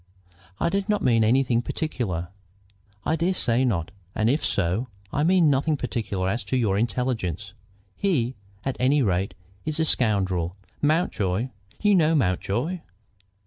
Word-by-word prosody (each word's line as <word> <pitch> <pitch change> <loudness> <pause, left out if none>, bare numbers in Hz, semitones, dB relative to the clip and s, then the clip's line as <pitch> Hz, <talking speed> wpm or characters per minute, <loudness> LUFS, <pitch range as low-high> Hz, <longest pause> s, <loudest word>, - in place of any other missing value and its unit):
"I 170 - +2
did 200 +3 -1
not 210 -1 +1
mean 115 -3 +4
anything 120 +1 +3
particular." 110 - -3 0.8
"I 160 - +2
dare 175 +4 +1
say 125 -5 +2
not, 95 -8 0 0.2
and 110 +2 +3
if 150 - 0
so, 100 +6 0 0.3
I 145 - +1
mean 175 0 +5
nothing 145 +3 +1
particular 105 -7 -2
as 105 +4 -1
to 130 +5 0
your 110 -6 +2
intelligence. 110 - -1 0.4
He, 135 -11 +1 0.3
at 135 -1 -2
any 135 +2 +3
rate, 95 -2 0 0.3
is 155 0 -2
a 160 - +3
scoundrel. 95 - +1 0.3
Mountjoy 125 - +1 0.3
you 210 -1 +5
know 165 -3 +4
Mountjoy?" 120 - 0
125 Hz, 145 wpm, -25 LUFS, 100-155 Hz, 0.8 s, mean